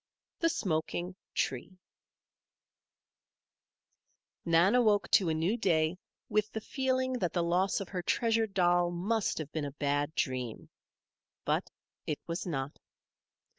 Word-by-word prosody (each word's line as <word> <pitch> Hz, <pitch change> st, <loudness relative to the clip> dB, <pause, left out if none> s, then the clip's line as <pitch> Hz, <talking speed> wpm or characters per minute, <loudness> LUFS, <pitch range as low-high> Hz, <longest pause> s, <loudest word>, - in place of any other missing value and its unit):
THE 330 Hz, -, +3 dB
SMOKING 175 Hz, -, -2 dB, 0.2 s
TREE 135 Hz, +8 st, -2 dB, 2.7 s
Nan 170 Hz, +4 st, +4 dB
awoke 220 Hz, -5 st, +3 dB
to 185 Hz, -4 st, +5 dB
a 160 Hz, -, +1 dB
new 170 Hz, +8 st, +1 dB
day 160 Hz, -6 st, +2 dB, 0.3 s
with 215 Hz, 0 st, +1 dB
the 220 Hz, -, -2 dB
feeling 260 Hz, +2 st, 0 dB
that 175 Hz, -5 st, -1 dB
the 175 Hz, -, +1 dB
loss 180 Hz, +3 st, +2 dB
of 195 Hz, -, -6 dB
her 185 Hz, -2 st, -3 dB
treasured 225 Hz, +1 st, +1 dB
doll 175 Hz, -1 st, +4 dB
must 200 Hz, +5 st, 0 dB
have 155 Hz, -2 st, -5 dB
been 155 Hz, -2 st, -2 dB
a 140 Hz, -, -5 dB
bad 145 Hz, +1 st, -1 dB
dream. 125 Hz, -4 st, -2 dB, 0.7 s
But -, -, 0 dB, 0.4 s
it 150 Hz, -, -1 dB
was 170 Hz, +2 st, -4 dB
not. 140 Hz, -3 st, -3 dB
175 Hz, 130 wpm, -31 LUFS, 155-210 Hz, 2.7 s, to